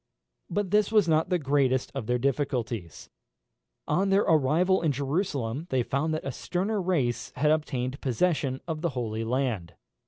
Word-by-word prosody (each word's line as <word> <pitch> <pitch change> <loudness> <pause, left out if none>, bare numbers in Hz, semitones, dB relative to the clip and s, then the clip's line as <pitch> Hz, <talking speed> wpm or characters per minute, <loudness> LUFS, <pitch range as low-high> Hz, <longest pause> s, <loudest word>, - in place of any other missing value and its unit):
But 205 -3 -1
this 210 0 +3
was 210 -5 +4
not 160 +1 +2
the 180 - +2
greatest 135 -4 +1
of 135 -6 -5
their 125 0 +2
difficulties. 120 - -2 0.8
On 190 +6 +1
their 195 +1 +4
arrival 165 +5 +3
in 160 -3 +2
Jerusalem 140 - -2
they 130 -5 +1
found 145 +5 -1
that 155 - -5
a 135 - -2
sterner 195 - -2
race 150 -10 0
had 150 +3 +2
obtained 135 -4 -1
possession 135 0 0
of 160 -2 -3
the 170 - +1
Holy 110 -2 -2
Land. 115 -7 -2
145 Hz, 160 wpm, -27 LUFS, 125-175 Hz, 0.8 s, was